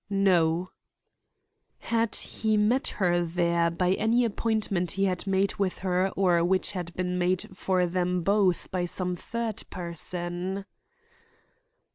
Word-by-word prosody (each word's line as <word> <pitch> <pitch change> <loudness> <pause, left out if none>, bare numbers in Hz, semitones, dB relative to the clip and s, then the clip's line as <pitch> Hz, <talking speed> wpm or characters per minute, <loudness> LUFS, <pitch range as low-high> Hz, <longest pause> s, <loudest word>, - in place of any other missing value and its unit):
"No" 180 -3 +2 1.1
Had 230 -1 0
he 215 -1 0
met 230 +6 +2
her 175 -3 +2
there 170 0 +1
by 180 +2 +1
any 230 +4 +2
appointment 210 -5 -1
he 195 - 0
had 185 +1 -1
made 195 0 +2
with 195 -2 -1
her 185 +1 +2
or 175 -3 +3
which 185 +1 +1
had 180 -3 -5
been 180 0 -1
made 185 +1 0
for 185 -1 +1
them 180 0 -1
both 195 -2 +2
by 180 -1 -1
some 180 +1 -2
third 230 +3 -4
person? 175 +2 -4
185 Hz, 130 wpm, -27 LUFS, 175-200 Hz, 1.1 s, or